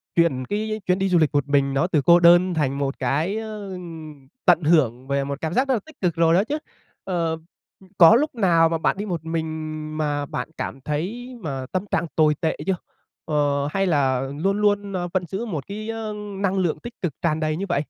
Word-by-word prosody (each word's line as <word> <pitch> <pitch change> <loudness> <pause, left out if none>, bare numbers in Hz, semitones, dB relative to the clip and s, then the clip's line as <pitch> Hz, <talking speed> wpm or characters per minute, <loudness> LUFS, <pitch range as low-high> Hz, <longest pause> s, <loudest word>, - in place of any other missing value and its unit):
chuyển 135 -7 +2
cái 215 +3 -3
chuyến 180 +1 +2
đi 195 0 +1
du 180 - +4
lịch 155 -2 +4
một 145 -1 +1
mình 140 -1 +2
đó 160 +6 +2
từ 155 -6 +2
cô 170 0 +7
đơn 175 +1 +6
thành 140 -4 0
một 140 -1 -2
cái, 150 - 0
ơ, 215 -3 -6 0.7
tận 175 -2 +5
hưởng 135 -6 +2
về 140 0 0
một 140 +1 -5
cảm 160 +1 -2
giác 265 +2 +2
rất 265 - +2
là 230 - +1
tích 315 - -15
cực 175 -3 +1
rồi 165 0 +4
đó 185 +4 +4
chứ. 290 +6 -2 0.5
Ờ, 170 -3 -1 0.5
ư, 190 - -18
có 175 +5 +9
lúc 295 +2 +1
nào 170 -7 +4
mà 165 - 0
bạn 160 - 0
đi 205 - -3
một 170 -5 -4
mình 160 0 -2 0.5
mà 145 -2 -1
bạn 125 -1 -5
cảm 135 - -5
thấy 205 - -4
mà 135 -6 -4
tâm 185 +1 -1
trạng - - +1
tồi 155 -1 +4
tệ 160 - 0
chưa? 190 - +1 0.5
Ờ, 145 -2 +1
hay 195 0 +1
là 135 -5 +2 0.2
luôn 195 +5 0
luôn, 205 -1 +1
ơ, 175 -1 -2
vẫn 185 -2 0
giữ 195 +7 -4
một 160 - -5
cái, 215 +2 -6
ơ, 225 -1 -4 0.2
năng 195 -1 0
lượng 175 -4 0
tích 235 -1 -8
cực 175 -6 -1
tràn 160 -2 +1
đầy 155 0 -1
như 195 - -3
vậy? 145 -4 +1
170 Hz, 230 wpm, -23 LUFS, 150-195 Hz, 0.7 s, có